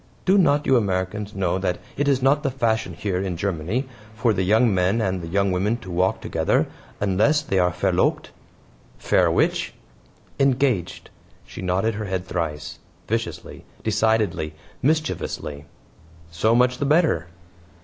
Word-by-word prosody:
"Do 190 - +4
not 150 -4 +3
you 130 - +4
Americans 100 0 -2
know 95 -1 0
that 90 -2 -1 0.2
it 145 - 0
is 135 -2 +2
not 140 +2 +4
the 140 - 0
fashion 115 -4 -1
here, 95 -3 -2
in 95 -3 -3
Germany, 100 - -2 0.3
for 110 0 +2
the 95 - -1
young 110 +4 +3
men 95 +4 +2
and 95 -4 -1
the 85 - -6
young 100 +3 +1
women 100 +6 0
to 95 -6 -10
walk 90 +2 +1
together - - +1 0.3
unless 105 +10 +2
they 95 -10 0
are 90 0 +3
VERLOBT?" 90 - 0 0.7
"VER - - +3
which?" - - 0 0.6
"Engaged." 135 -7 +1 0.3
She - - -9
nodded 95 +5 0
her 105 +1 -4
head 95 -2 -3
thrice: 80 -5 -4 0.3
viciously, - - -4 0.2
decidedly, 110 -7 +1 0.3
mischievously. 130 - -1 0.7
"So 110 +7 +2
much 125 +1 +3
the 145 - 0
better." 150 - +2
100 Hz, 150 wpm, -23 LUFS, 90-125 Hz, 0.7 s, Do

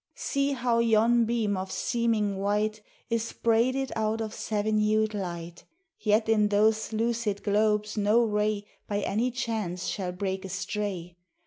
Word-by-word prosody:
See 280 0 0
how 240 -3 +1
yon 230 +1 +4
beam 225 -3 0
of 190 0 -4
seeming 220 -4 0
white 210 +2 0 0.3
Is 230 0 -1
braided 250 +4 +1
out 220 0 0
of 220 -1 -4
seven 215 0 -1
hued 215 0 +2
light, 175 -3 -5 0.4
Yet 215 +1 +2
in 215 -2 +4
those 215 +2 +2
lucid 225 -2 -1
globes 210 +1 +1
no 210 +3 +4
ray 210 -1 0 0.2
By 205 0 -1
any 230 +5 0
chance 220 -8 -3
shall 185 -3 -2
break 190 +1 -3
astray. 190 -2 -4
215 Hz, 140 wpm, -28 LUFS, 205-230 Hz, 0.4 s, yon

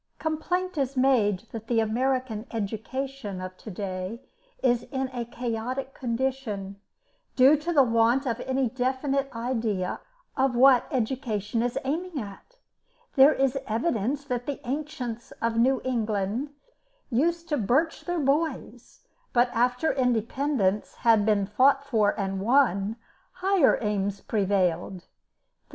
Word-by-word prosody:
Complaint 350 +2 -2
is 270 0 -1
made 230 -8 +3
that 225 -1 -7
the 235 -2 +2
American 240 0 -1
education 225 +1 -4
of 185 0 -6
to - - -10
day 190 +2 -5 0.4
is 245 -2 +3
in 265 -1 -2
a 240 -2 -3
chaotic 245 +3 -4
condition, 230 -6 -3 0.5
due 265 +3 +7
to 315 +4 -3
the 290 -5 +6
want 230 +3 +2
of 235 -2 -1
any 265 0 0
definite 265 +3 -1
idea 225 -6 -2 0.4
of 265 -1 +1
what 255 0 +6
education 230 -3 -1
is 240 0 -1
aiming 325 +3 -2
at. 210 - -10 0.6
There 280 +2 +7
is 270 0 +1
evidence 245 +3 -1
that 245 -3 -3
the 285 - -3
ancients 260 -5 -4
of 230 0 -2
New 260 +3 +3
England 225 +1 -1 0.6
used 335 +7 +1
to 295 - +1
birch 270 +9 +1
their 350 -1 -1
boys, 275 -4 -2 0.3
but 245 0 +4
after 250 +6 +1
independence 245 -3 0
had 225 -3 +3
been 205 -2 +3
fought 265 +7 +3
for 220 -7 +1
and 195 -1 -2
won, 220 -3 +2 0.4
higher 370 -4 +3
aims 200 -1 -1
prevailed. 190 -4 0
245 Hz, 130 wpm, -26 LUFS, 215-270 Hz, 0.6 s, due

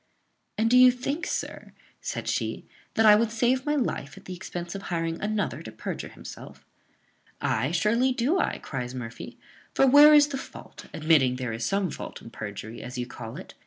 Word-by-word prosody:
"And 220 +1 +2
do 250 +2 +6
you 255 0 +9
think, 255 +6 -2
sir," - - -5 0.3
said - - -4
she, - - -2 0.3
"that 225 - +4
I 210 -1 +9
would 225 +1 +2
save 245 +4 +1
my 295 - +2
life 145 - -2
at - - -14
the 185 - -6
expense 175 -1 -6
of 195 - -6
hiring 165 -1 -2
another 210 -8 -2
to 135 - -9
perjure 110 - -5
himself?" - - -11 0.7
"Ay, 115 +5 0
surely 220 +10 +2
do 265 +9 +1
I," - - 0
cries 125 -2 -5
Murphy; 115 -2 -7 0.4
"for 270 - +5
where 290 +3 +8
is 295 0 +6
the 270 -2 -3
fault, - - -11
admitting 150 -5 +3
there 125 -3 -4
is 115 +1 -3
some 195 -3 0
fault - - -7
in 115 - -12
perjury, 110 +2 -7
as 125 +1 -7
you 125 - -2
call 115 -2 -8
it? - - -10
190 Hz, 195 wpm, -26 LUFS, -, 0.7 s, you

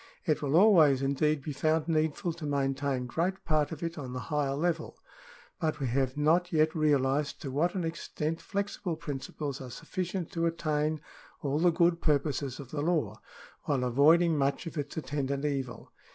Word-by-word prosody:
It 155 -5 +1
will 145 0 0
always, 165 -9 +6
indeed, 140 +1 +1
be 150 - -4
found 155 +2 +1
needful 160 +2 0
to 165 -1 -7
maintain 135 -2 0
great 175 +9 -2
part 155 -1 +1
of 160 0 -6
it 165 -1 -3
on 130 -3 -6
the 130 - -3
higher 140 -2 +1
level, 165 +1 -1 0.6
but 155 -1 -1
we 140 - -1
have 130 +2 0
not 165 +4 +3
yet 155 -1 +3
realised 145 -2 +1
to 135 - -4
what 165 +7 +1
an 185 - -1
extent 165 -1 -3
flexible 200 -3 -3
principles 145 -2 -5
are 130 - -7
sufficient 175 +5 -4
to 165 0 0
attain 155 -2 -1 0.4
all 145 +1 0
the 175 +2 +5
good 170 0 +2
purposes 140 -3 0
of 135 -3 -9
the 145 - -2
law, 145 - 0 0.4
while 135 -3 +1
avoiding 155 +7 +4
much 140 +3 0
of 165 - -6
its 145 -1 -4
attendant 140 -1 -2
evil. 135 -4 -3
150 Hz, 175 wpm, -30 LUFS, 140-165 Hz, 0.6 s, always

